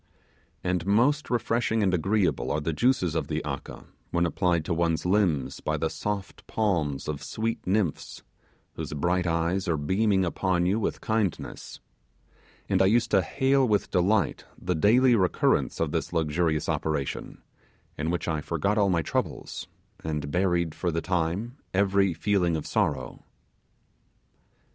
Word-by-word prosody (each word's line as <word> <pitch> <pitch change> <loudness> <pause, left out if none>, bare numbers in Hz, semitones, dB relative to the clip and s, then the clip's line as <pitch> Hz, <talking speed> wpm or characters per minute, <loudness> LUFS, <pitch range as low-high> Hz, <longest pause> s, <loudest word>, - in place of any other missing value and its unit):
And 90 0 -1
most 130 +9 +3
refreshing 115 -2 +1
and 95 -2 +2
agreeable 90 -2 +1
are 75 - +1
the 80 +2 -2
juices 120 - +2
of 80 - -1
the 80 -1 -3
'aka', 70 -2 -6 0.3
when 85 0 +1
applied 85 -2 +1
to 85 - -1
ones, 85 -1 0
limbs 85 -9 +1
by 75 0 -1
the 80 +1 -1
soft 105 -3 -5
palms 85 -11 0
of 75 -2 -3
sweet 115 -1 -3
nymphs, 95 -4 -1 0.5
whose - - -5
bright 90 +5 0
eyes 85 +3 0
are 85 -2 +1
beaming 95 +6 +2
upon 90 0 0
you 100 +5 +2
with 110 - -2
kindness; 110 -5 -2 0.9
and - - +2
I 95 - +5
used 115 +3 +2
to 95 - +5
hail 135 +6 +2
with 105 -3 +1
delight 100 +3 +1 0.2
the 90 - -1
daily 120 +9 +4
recurrence 95 -5 +1
of - - 0
this - - -2
luxurious 80 -1 0
operation, 75 -4 -3 0.5
in 75 +2 -2
which 85 0 -2
I 80 -2 -1
forgot 90 +8 0
all 100 -1 +3
my 85 -3 +1
troubles, - - -3 0.4
and 75 -3 -3
buried 85 -2 +1
for 90 - -2
the 85 +1 -1
time 90 - -1 0.2
every 100 -2 +3
feeling 90 -1 +1
of 80 - -3
sorrow. 65 - -1
90 Hz, 150 wpm, -27 LUFS, 80-105 Hz, 0.9 s, I